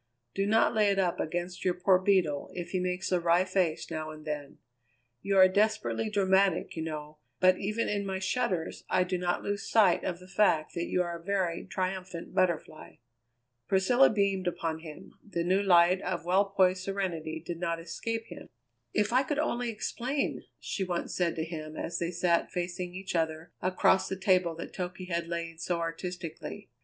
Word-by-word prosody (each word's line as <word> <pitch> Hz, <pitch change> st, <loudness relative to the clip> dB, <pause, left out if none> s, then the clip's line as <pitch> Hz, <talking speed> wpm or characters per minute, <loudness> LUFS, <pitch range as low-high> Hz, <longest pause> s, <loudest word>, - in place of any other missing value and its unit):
Do 195 Hz, 0 st, 0 dB
not 220 Hz, +3 st, +4 dB
lay 215 Hz, -2 st, +3 dB
it 200 Hz, -, +1 dB
up 180 Hz, -3 st, +1 dB
against 175 Hz, +2 st, -3 dB
your 180 Hz, -1 st, +1 dB
poor 180 Hz, +1 st, +4 dB
Beetle 185 Hz, -7 st, +1 dB
if 175 Hz, -1 st, -5 dB
he 185 Hz, -, 0 dB
makes 180 Hz, +1 st, -2 dB
a 180 Hz, -, +3 dB
wry 170 Hz, +2 st, +3 dB
face 185 Hz, -4 st, 0 dB
now 155 Hz, -1 st, -3 dB
and 155 Hz, 0 st, -10 dB
then. 150 Hz, -2 st, -5 dB, 0.6 s
You 195 Hz, +4 st, 0 dB
are 185 Hz, 0 st, +9 dB
desperately 215 Hz, +2 st, +1 dB
dramatic, 195 Hz, -3 st, +2 dB
you 160 Hz, -, -3 dB
know, 155 Hz, -1 st, -6 dB, 0.2 s
but 185 Hz, 0 st, +5 dB
even 215 Hz, +3 st, -1 dB
in 205 Hz, -1 st, -1 dB
my 190 Hz, -1 st, -2 dB
shudders 190 Hz, -3 st, -1 dB
I 185 Hz, -, +3 dB
do 180 Hz, 0 st, -2 dB
not 175 Hz, 0 st, -1 dB
lose 205 Hz, 0 st, -3 dB
sight 205 Hz, -6 st, +4 dB
of 180 Hz, -2 st, -2 dB
the 185 Hz, +1 st, -14 dB
fact 185 Hz, -6 st, +2 dB
that 170 Hz, -1 st, -2 dB
you 180 Hz, -, +1 dB
are 170 Hz, -1 st, -5 dB
a -, -, -18 dB
very 185 Hz, -3 st, -1 dB
triumphant 185 Hz, -2 st, -4 dB
Butterfly." 170 Hz, -4 st, -1 dB, 0.7 s
Priscilla 240 Hz, +8 st, +5 dB
beamed 200 Hz, -3 st, +1 dB
upon 165 Hz, -2 st, -2 dB
him; 160 Hz, -2 st, -11 dB
the 175 Hz, -5 st, -3 dB
new 185 Hz, +3 st, +2 dB
light 180 Hz, -1 st, +5 dB
of 180 Hz, -2 st, -3 dB
well 190 Hz, +3 st, +4 dB
poised 190 Hz, -2 st, +2 dB
serenity 175 Hz, -5 st, -3 dB
did 170 Hz, +1 st, -6 dB
not 170 Hz, -1 st, -1 dB
escape 225 Hz, +7 st, -4 dB
him. -, -, -11 dB, 0.5 s
"If 210 Hz, +2 st, +2 dB
I 255 Hz, -, +5 dB
could 280 Hz, +2 st, -2 dB
only 245 Hz, -5 st, 0 dB
explain!" 250 Hz, +5 st, -2 dB
she 195 Hz, -, -3 dB
once 180 Hz, -2 st, -3 dB
said 175 Hz, -2 st, 0 dB
to 160 Hz, -, -2 dB
him 155 Hz, -2 st, -7 dB
as 170 Hz, -, -3 dB
they 170 Hz, -, -1 dB
sat 175 Hz, -1 st, +1 dB
facing 180 Hz, 0 st, -4 dB
each 190 Hz, 0 st, -5 dB
other 160 Hz, 0 st, -1 dB
across 185 Hz, +1 st, +3 dB
the 190 Hz, -, -3 dB
table 185 Hz, -3 st, +2 dB
that 165 Hz, -, -8 dB
Toky 185 Hz, 0 st, -5 dB
had 170 Hz, -1 st, -1 dB
laid 165 Hz, -1 st, -4 dB
so 175 Hz, 0 st, 0 dB
artistically. 170 Hz, 0 st, -5 dB
180 Hz, 190 wpm, -30 LUFS, 170-195 Hz, 0.7 s, are